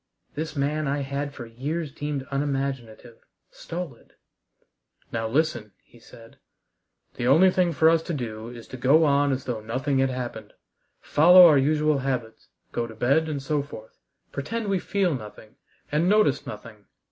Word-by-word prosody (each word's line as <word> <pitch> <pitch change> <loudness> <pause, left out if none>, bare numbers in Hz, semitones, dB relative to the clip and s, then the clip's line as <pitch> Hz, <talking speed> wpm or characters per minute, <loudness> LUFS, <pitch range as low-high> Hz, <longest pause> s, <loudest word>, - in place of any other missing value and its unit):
This 155 +1 -5
man 150 +2 -1
I 140 +1 -1
had 140 +1 -3
for 130 -4 -9
years 140 +7 -4
deemed 145 -2 -4
unimaginative, 135 -5 -3 0.3
stolid! 165 -8 -8 1.0
"Now 115 -1 -2
listen," 120 -6 -1
he 120 - -21
said. 115 0 -16 0.8
"The 120 - -1
only 180 +8 +6
thing 180 -2 +2
for 160 +1 +3
us 165 0 +4
to - - 0
do 115 -3 -5
is 120 -2 -11
to 130 - -8
go 140 +6 +4
on 140 -1 +3
as 130 0 -3
though 120 -4 -3
nothing 130 +5 -1
had 135 0 +2
happened, 125 -2 -6 0.5
follow 180 +4 +7
our 150 -5 +6
usual 150 +1 +2
habits, 125 -4 -4 0.2
go 115 - -2
to 110 - -11
bed, 150 +8 +2
and 140 -3 -4
so 145 +1 0
forth; 110 -6 -12 0.3
pretend 215 +10 -4
we 195 -2 +1
feel 190 -2 0
nothing 110 -3 -9 0.3
and 160 +5 +2
notice 205 -10 +2
nothing. 105 -1 -10
140 Hz, 160 wpm, -25 LUFS, 120-155 Hz, 1.0 s, follow